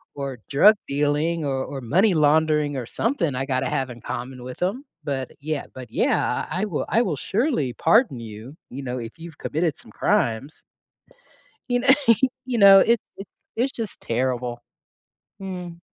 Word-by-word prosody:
or 140 -4 -5
drug 195 +10 +7
dealing 150 +3 0
or 135 -1 -1
or 140 - -6
money 180 - +3
laundering 150 -1 +3
or 125 -3 -3
something 180 - -1
I 135 - -1
gotta 130 -1 0
have 130 -1 -1
in 120 -1 -11
common 125 +1 -6
with 125 0 -9
'em." 210 +10 -1 0.2
But 135 -3 -3
yeah 155 0 -3
but 130 -3 -9
yeah, - - +1
"I 185 - -2
I - - +1
will 180 -8 -2
I 230 - +3
will 175 -8 -1
surely 190 - 0
pardon 165 - +3
you, 115 +5 -9
you 135 +3 -6
know, 125 -1 -3
if 115 +2 -7
you've 165 -2 -10
committed 160 -1 -1
some - - -13
crimes." 120 +6 0 1.1
You 245 0 +2
kn 255 +1 +6 0.5
You 250 -2 -1
know, 195 -2 +9
it 230 +2 +3 0.2
it's 195 - -10 0.3
it's 260 +4 0
just 225 -4 -5
terrible. 120 0 -2 0.8
Mm. 180 -3 -7
145 Hz, 170 wpm, -23 LUFS, 130-190 Hz, 1.1 s, know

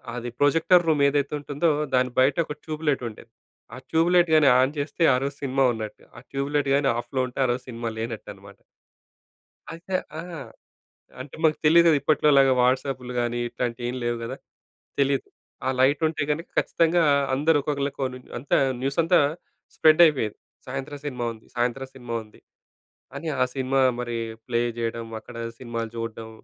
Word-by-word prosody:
అది 120 0 -4
projector 165 +4 +4
room 150 -3 +3
ఏదైతే 140 +1 -1
ఉంటుందో, 145 +3 0 0.2
దాని 125 0 +2
బయట 130 +1 +4
ఒక 150 - -6
ట్యూబ్ 155 0 -6
లైట్ 135 -3 0
ఉండేది. 115 +1 -15 0.4
ఆ - - -9
ట్యూబ్ 165 +2 +2
లైట్ 175 -2 +4
గాని 145 -3 +6
ఆన్ 130 +4 +2
చేస్తే, 150 +4 -2
ఆరోజు 140 +2 -2
సినిమా 135 0 +2
ఉన్నట్టు. 110 -1 -7
ఆ - - -10
ట్యూబ్ 140 +1 -3
లైట్ 145 -1 +1
గాని 140 -1 +2
ఆఫ్‌లో 130 +2 -2
ఉంటే, 125 - -9
ఆ - - +1
రోజు 125 +1 -3
సినిమా 115 -1 -4
లేనట్టనమాట. 100 -3 -7 1.2
అయితే 170 +3 -7 0.2
ఆ! - - -2 1.0
అంటే 130 +1 -9
మాకు 155 -1 +4
తెలీదు 170 +2 +6
కదా! 155 - +5
ఇప్పట్లోలాగా 140 -3 +4
వాట్సాప్‍లు 125 0 0
గానీ, 120 0 -1
ఇట్లాంటియేమి 120 +1 -3
లేవు 120 0 0
గదా! 115 - -5 0.6
తెలీదు. 140 0 +1 0.4
ఆ - - +2
లైటుంటే 155 +4 +2
గనుక 160 +3 -2
ఖచ్చితంగా 170 +1 +2 0.3
అందరూ 150 +3 +3
ఒక్కొక్కళ్ళకోనుం 140 -3 -3 0.2
అంతా, 135 - 0 0.2
న్యూసంతా 165 +6 +2 0.6
స్ప్రెడ్డయిపోయేది. 155 -8 +4 0.3
సాయంత్రం 145 +2 -5
సినిమా 125 -4 -3
ఉంది, 110 - -17
సాయంత్రం 125 +2 -1
సినిమా 120 -3 -7
ఉంది. 105 - -20 0.8
అని, 160 +3 -6
ఆ - - +6
సినిమా 135 0 0 0.2
మరి 120 -1 -3 0.3
ప్లే 120 -1 +1 0.2
జేయడం, 115 0 -3
అక్కడ 120 - -13 0.2
సినిమాలు 115 -2 -4
జూడడం. 115 -1 -5
135 Hz, 150 wpm, -25 LUFS, 120-150 Hz, 1.2 s, గాని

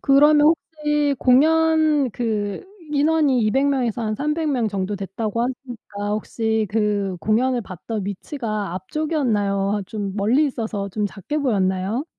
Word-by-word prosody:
그러면 295 +2 +5
혹시 295 -3 0
공연 310 0 +3
그 210 - -2 0.3
인원이 290 -3 +3
200 270 +6 +2
명에서 245 -4 0
한 215 -1 -1
300 300 +3 -1
명 245 -5 +1
정도 200 0 -2
됐다고 210 +4 -3
하시니까 240 -5 -5
혹시 220 +1 -1
그 205 -3 0
공연을 240 +4 +1
봤던 195 +3 -6
위치가 210 - -4
앞쪽이었나요? 205 - -1
아 - - -4
좀 200 -2 -4
멀리 235 +9 +3
있어서 220 -6 -3
좀 205 +2 -1
작게 255 +10 -4
보였나요? 200 0 0
230 Hz, 275 characters per minute, -22 LUFS, 205-285 Hz, 0.3 s, 그러면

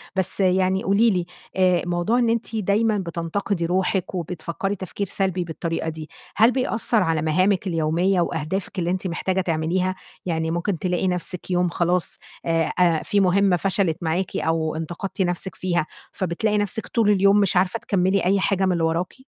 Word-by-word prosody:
بس 190 +1 -1
يعني 185 0 +2
قولي 205 +4 +4
لي 180 -4 0 0.3
آآ، 185 -2 +3
موضوع 175 +7 +1
إن 235 -2 +2
أنتِ 230 0 -1
دايمًا 215 +1 +1
بتنتقدي 170 +1 -2
روحِك 185 +1 0
وبتفكّري 175 +3 -3
تفكير 195 +1 -5
سلبي 190 -2 -1
بالطريقة 165 0 -3
دي، 155 -1 -8 0.3
هل 225 +4 +5
بيأثّر 230 -4 +1
على 165 -2 0
مهامِك 185 +5 +1
اليومية 170 +3 +1
وأهدافِك 170 +4 -3
اللي 175 0 0
أنتِ 185 0 -2
محتاجة 185 +2 -1
تعمليها؟ 180 +2 0 0.3
يعني 160 -2 -1
ممكن 175 +1 -1
تلاقي 180 0 0
نفسِك 180 0 -3
يوم 180 0 +2
خلاص 175 +1 0 0.3
آآ، 165 -1 +2
أ 170 -3 +3
في 205 - +1
مهمة 190 0 +3
فشلت 185 -3 0
معاكِ 170 +3 -1
أو 160 -1 0
انتقدتِ 175 +5 -4
نفسِك 180 +1 -2
فيها، 175 -3 0 0.3
فبتلاقي 200 +4 -1
نفسِك 205 +2 -2
طول 225 -4 +2
اليوم 200 0 +5
مش 195 -3 +2
عارفة 190 +5 +1
تكمّلي 190 -1 +1
أي 195 +2 +3
حاجة 195 0 +1
من 185 - +2
اللي 170 -2 0
وراكِ؟ 165 +2 0
185 Hz, 170 wpm, -23 LUFS, 170-195 Hz, 0.3 s, هل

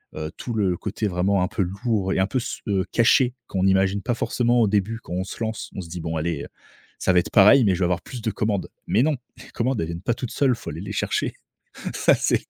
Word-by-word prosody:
heu, 80 0 -4
tout 120 - -5
le 95 -5 +1
côté 105 +1 -3
vraiment 95 +1 +1
un - - +1
peu 100 - -3 0.2
lourd 100 -5 +1
et - - 0
un 95 - +3
peu 130 - 0
s - - -5
heu, 95 -2 +1
caché 125 +2 +4
qu'on 95 -1 0
imagine 95 +1 +2
pas 120 +2 -1
forcément 120 0 +1
au 110 - +4
début 105 +3 0
quand - - -8
on 90 +1 -1
se 95 - -8
lance, 110 0 -4
on 95 - -3
se 85 - -9
dit: 90 0 -5
«bon 80 0 -3
allez, 80 -2 -2
heu, - - -7 0.5
ça 95 - +2
va 90 - +6
être - - -3
pareil, 110 +6 +7
mais 95 -2 +3
je - - -5
vais 90 - +2
avoir 90 0 0
plus 125 -3 -8
de 110 -1 -1
commandes.» 105 -2 -1 0.2
Mais 115 - +3
non, 155 -1 +2 0.2
les - - -13
commandes, 125 0 -1
elles 80 - 0
viennent 85 +1 -5
pas 120 +4 0
toutes 125 -2 -5
seules, 130 -4 +2
faut - - -8
aller 80 +4 -6
les 100 +1 -6
chercher. 100 - -1 0.6
Ça - - +4
c'est, - - +1
100 Hz, 270 wpm, -24 LUFS, 90-115 Hz, 0.6 s, pareil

